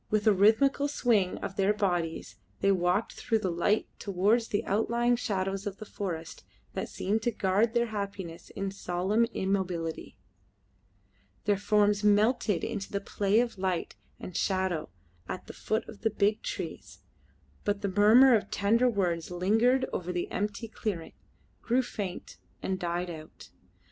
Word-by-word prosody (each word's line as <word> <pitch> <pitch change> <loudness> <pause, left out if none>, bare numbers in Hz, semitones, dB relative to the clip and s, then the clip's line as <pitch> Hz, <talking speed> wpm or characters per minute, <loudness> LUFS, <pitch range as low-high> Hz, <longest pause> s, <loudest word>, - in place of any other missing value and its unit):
With 215 -1 +1
a 215 - +6
rhythmical 225 +8 +4
swing 225 -10 +1
of 195 - -5
their 200 +2 +3
bodies 175 - -1 0.2
they 195 - +3
walked 185 +3 +1
through 225 - 0
the 190 -4 -1
light 190 +6 +1
towards 205 +4 +1
the 205 - -1
outlying 235 +4 +2
shadows 195 -3 -2
of 200 -1 -5
the 215 - -8
forests 170 -6 -5 0.3
that - - -3
seemed 210 +4 -1
to 240 - 0
guard 210 +3 +1
their 235 0 +3
happiness 195 -6 -6
in 195 0 -4
solemn 195 +4 0
immobility. 185 - -2 1.3
Their 205 - +3
forms 210 0 +2
melted 210 -1 +3
in 225 -2 -2
the 200 - -2
play 200 +1 +1
of 235 -5 -3
light 185 -2 -1 0.2
and 180 - -8
shadow 185 -5 0 0.4
at - - -5
the - - -9
foot 220 +1 -2
of 220 - -11
the 225 - +2
big 215 +1 +1
trees, - - -6 0.6
but 205 0 -1
the - - +1
murmur 235 +6 +7
of 215 - -1
tender 230 +5 +3
words 180 -7 -1
lingered 225 +9 +2
over 180 0 -2
the 175 -1 -3
empty 210 +3 -2
clearing, 200 -6 -4 0.5
grew 250 +2 +2
faint, 200 -6 -6 0.3
and 190 -1 -1
died 175 0 -2
out. 155 -1 -11
200 Hz, 155 wpm, -29 LUFS, 185-220 Hz, 1.3 s, murmur